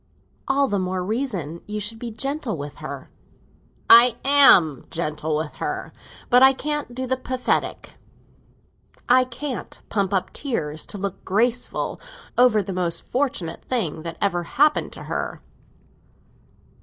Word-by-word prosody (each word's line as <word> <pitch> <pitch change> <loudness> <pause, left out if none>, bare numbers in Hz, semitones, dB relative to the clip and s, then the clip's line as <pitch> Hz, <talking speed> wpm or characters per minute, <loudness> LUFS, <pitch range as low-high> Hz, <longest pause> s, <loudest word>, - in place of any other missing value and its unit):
"All 275 0 +2
the 205 -5 0
more 185 0 -2
reason 190 - -3
you 210 0 -3
should 215 +2 -2
be 240 - -5
gentle 265 - -3
with 145 0 -7
her." - - -8 0.8
"I 235 +1 +8
am 195 - +5
gentle 155 -1 -2
with 155 0 -4
her. - - -4 0.4
But 250 +1 +7
I 265 0 +8
can't 295 -2 -4
do 260 +1 -3
the 260 +1 -1
pathetic; 255 0 -2 1.1
I 255 +1 +6
can't 255 +2 -6
pump 200 -2 0
up 190 -2 -1
tears, 160 - -3
to - - -6
look 195 -1 -5
graceful, 235 +5 -1 0.4
over 245 -4 +4
the 190 - -5
most 175 -2 -2
fortunate 245 -12 -2
thing 175 -11 -2
that 165 0 -6
ever 185 -3 +1
happened 295 - +2
to - - -9
her." - - -4
215 Hz, 140 wpm, -23 LUFS, 175-255 Hz, 1.1 s, I